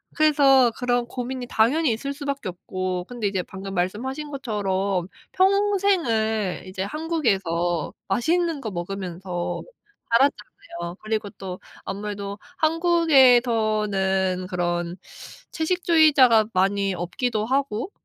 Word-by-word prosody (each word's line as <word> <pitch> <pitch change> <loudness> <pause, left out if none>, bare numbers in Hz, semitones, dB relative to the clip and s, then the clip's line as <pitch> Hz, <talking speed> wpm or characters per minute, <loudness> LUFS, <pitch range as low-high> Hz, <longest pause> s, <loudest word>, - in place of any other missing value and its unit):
그래서 275 -5 +5
그런 245 -1 0
고민이 250 +1 -5
당연히 265 +6 +3
있을 275 +6 -3
수밖에 280 -4 -4
없고 185 0 -4
근데 240 -4 -2
이제 190 -3 -1
방금 195 +1 -8
말씀하신 260 +11 -3
것처럼 200 -7 -1 0.3
평생을 370 - +1
이제 185 0 -4
한국에서 195 - -1
맛있는 320 - 0
거 220 -4 -4
먹으면서 180 0 -4 0.5
살았잖아요. 210 -8 -1
그리고 215 -1 -2
또 185 -3 -8 0.3
아무래도 200 0 -5 0.2
한국에서는 230 - +3
그런 175 -1 -2 0.5
채식주의자가 315 - +4
많이 195 +1 +1
없기도 215 +5 -2
하고 265 - -1
220 Hz, 270 characters per minute, -24 LUFS, 190-275 Hz, 0.5 s, 그래서